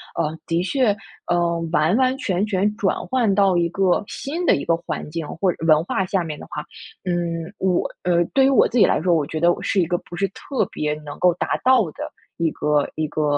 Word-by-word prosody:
呃， 155 +1 -1
的 165 +1 0
确， 215 +2 +1 0.3
呃， 170 -1 +1
完 170 +7 +3
完 260 0 +2
全 190 -2 0
全 205 0 +1
转 200 -4 +1
换 235 -6 +2
到 195 -3 +3
一 170 0 +2
个 190 +1 +1
新 330 +6 -4
的 - - +5
一 - - -3
个 165 0 +1
环 155 -3 -5
境 160 -1 -4
或 180 +2 0
者 - - -9
文 155 0 +5
化 190 +1 -1
下 185 -1 0
面 155 -2 -6
的 - - -9
话， 150 0 -5 0.4
嗯， 170 -1 -2
我 185 -2 +1
呃， 175 -1 +3
对 270 -1 +5
于 - - +5
我 - - +5
自 250 - -2
己 - - +7
来 - - +1
说， 175 -1 +3
我 150 - +1
觉 155 +2 -4
得 170 +2 +4
我 - - -3
是 190 - +1
一 - - +2
个 175 - 0
不 175 - -10
是 195 +2 0
特 255 +6 -3
别 150 0 -1
能 145 - -7
够 180 -1 +4
达 - - -1
到 255 -6 +5
的 - - -7 0.3
一 165 -2 +1
个 150 -1 +1
一 155 -1 -2
个， 155 +1 -2
175 Hz, 255 characters per minute, -22 LUFS, 165-200 Hz, 0.4 s, 己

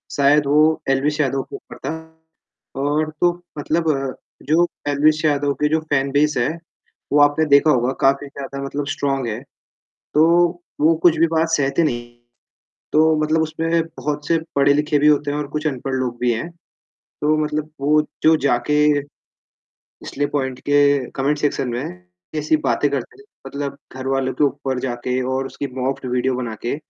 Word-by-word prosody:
शायद 145 +1 +4
वो 155 +2 +3
एलवीश 145 +3 +1
यादव 135 -1 0
के - - -10
ऊपर 385 - -11
था - - -1 0.9
और 150 +2 0
तो 175 0 +5 0.3
मतलब 160 +2 0
अ, 135 -2 -2 0.3
जो 170 +3 +3 0.2
एलवीश 150 +2 +2
यादव 145 -1 +2
के 150 - +3
जो 160 +1 +2
फैन 135 -1 +1
बेस 150 +1 +2
है, 120 +2 +1 0.6
वो 145 - +5
आपने 145 +2 +4
देखा 140 +2 +5
होगा 125 -1 +2
काफ़ी 140 +1 +2
ज़्यादा 140 0 -7
मतलब 140 +1 -3
स्ट्रॉन्ग 135 -3 -1
है 110 +2 -4 0.7
तो, 170 +3 +5 0.3
वो 160 +2 +5
कुछ 175 -2 +5
भी 165 - +5
बात 165 0 +1
सहते 145 -1 +1
नहीं 120 -5 -1
हैं, 120 0 -27 0.7
तो 155 +1 +4
मतलब 155 +1 +2
उसपे 165 +1 0
बहुत 150 -2 -5
से 165 - +3 0.2
पढ़े 140 0 +5
लिखे 150 +1 +1
भी 150 - +3
होते 150 -1 +2
हैं 145 - -2
और 150 -1 -4
कुछ 150 +1 -3
अनपढ़ 135 -1 -2
लोग 125 -2 -2
भी 125 -1 +2
हैं। 115 +9 -4 0.7
तो 155 +1 +3
मतलब 155 0 -3
वो 150 +2 +3 0.2
जो 160 0 +6
जाके, 145 +2 +2 1.1
स्ले 145 +1 -1
पॉइंट 130 -3 -2
के 145 0 +5 0.4
कमेंट 140 +2 0
सेक्शन 145 -3 -1
में 120 -7 -5 0.3
ऐसी 155 +1 +2
बातें 150 -1 +1
करते 140 -4 -4
हैं, - - -17 0.2
मतलब 140 -1 -5 0.2
घरवालों 130 0 -1
के 145 - +2
ऊपर 135 -1 -1
जाके 125 0 -2
और 135 0 -1
उसकी 140 - -5
मॉक्ड 130 0 -2
वीडियो 125 +1 +1
बना 120 -3 -4
के, 120 +4 -2
145 Hz, 175 wpm, -20 LUFS, 135-155 Hz, 1.1 s, जो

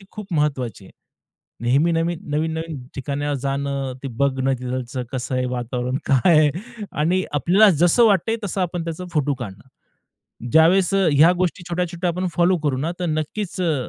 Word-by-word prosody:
ती - - -16
खूप 210 -2 -8
महत्त्वाची 130 -9 -1
आहे. - - -15 0.8
नेहमी-नेहमी, 165 +6 +2
नवीन-नवीन 160 -1 -3
ठिकाणी 140 +1 -3 0.2
जाणं, 140 -1 -2
ते - - -3
बघणं, 135 0 +1
तिथचं 125 0 -4
कसं 130 0 -3
आहे 130 - 0
वातावरण, 125 +1 -3
काय 155 +5 +4
आहे? 150 -1 +4 0.4
आणि 175 +5 +1
आपल्याला 185 - +5
जसं 175 +7 +5
वाटतंय 215 +2 +2
तसं, 195 0 -2
आपण 175 -1 -2
त्याचा 165 +2 -5
फोटो 150 -2 +1
काढणं. 100 -4 -8 0.9
ज्यावेळेस 175 +4 +5
अ, 195 -2 +3
ह्या 155 +5 +6
गोष्टी 180 0 -1
छोट्या-छोट्या 175 0 -1
आपण 180 +2 -2
फॉलो 175 +1 +3
करू 140 -3 +1
ना, 160 +5 -2
तर 180 - -1
नक्कीच 170 +5 -3
अ, 165 -4 +1
155 Hz, 160 wpm, -22 LUFS, 135-175 Hz, 0.9 s, ह्या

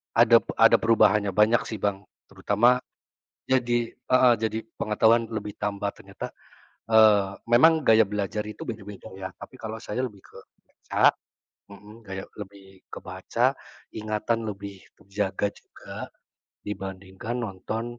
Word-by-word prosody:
Adap - - +5
ada - - +7
perubahannya, 105 -3 +3
banyak 105 +4 +3
sih, 110 - -5
Bang. 100 0 -1 0.2
Terutama 120 +5 +2 0.6
jadi 120 -2 0
heeh, 125 0 +3
jadi 110 0 -1 0.2
pengetahuan 115 +2 +3
lebih 110 -2 -5
tambah 100 -1 -2
ternyata, 100 0 -9 0.6
eee, 105 -3 +5 0.2
memang 160 +7 +6
gaya 110 -4 +5
belajar 105 +1 -3
itu 105 - -8
beda-beda 105 -2 -8
ya, 95 0 -5
tapi 130 - -12
kalau 110 -1 -6
saya 125 +5 -3
lebih 105 -5 -12
ke - - -15 0.2
baca - - +2 0.6
mhm, 105 +2 -14
gaya 95 0 -6
lebih 95 -2 -12
ke - - -9
baca, - - -1 0.4
ingatan 110 +1 -2
lebih 100 -1 -7 0.2
terjaga 100 +1 -2
juga - - -14 0.7
dibandingkan 95 +2 -6
nonton 110 +4 -5
105 Hz, 125 wpm, -26 LUFS, 100-115 Hz, 0.7 s, ada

